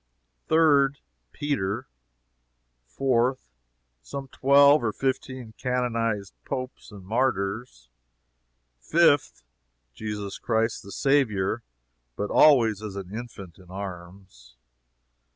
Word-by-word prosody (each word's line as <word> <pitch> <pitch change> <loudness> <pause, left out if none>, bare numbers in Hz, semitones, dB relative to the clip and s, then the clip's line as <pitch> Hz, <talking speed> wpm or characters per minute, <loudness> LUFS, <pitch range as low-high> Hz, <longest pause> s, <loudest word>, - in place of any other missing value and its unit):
Third 145 -4 +4 0.3
Peter. 120 - -2 1.0
Fourth 125 - 0 0.5
Some 140 -1 -7
twelve 140 +1 +5
or 110 - +1
fifteen 130 -2 -3
canonized 115 -5 -1
Popes 130 -2 -6
and 100 -3 -12
martyrs. 100 - -2 0.9
Fifth 145 - +2 0.5
Jesus 105 - -5
Christ 115 -1 0
the 100 - -12
Saviour 115 -7 +1 0.5
(but 105 - -3
always 115 -9 +5
as 105 -2 -6
an 100 +1 -7
infant 100 -7 -9
in 90 -2 -17
arms.) 90 -9 -9
115 Hz, 90 wpm, -26 LUFS, 100-135 Hz, 1.0 s, twelve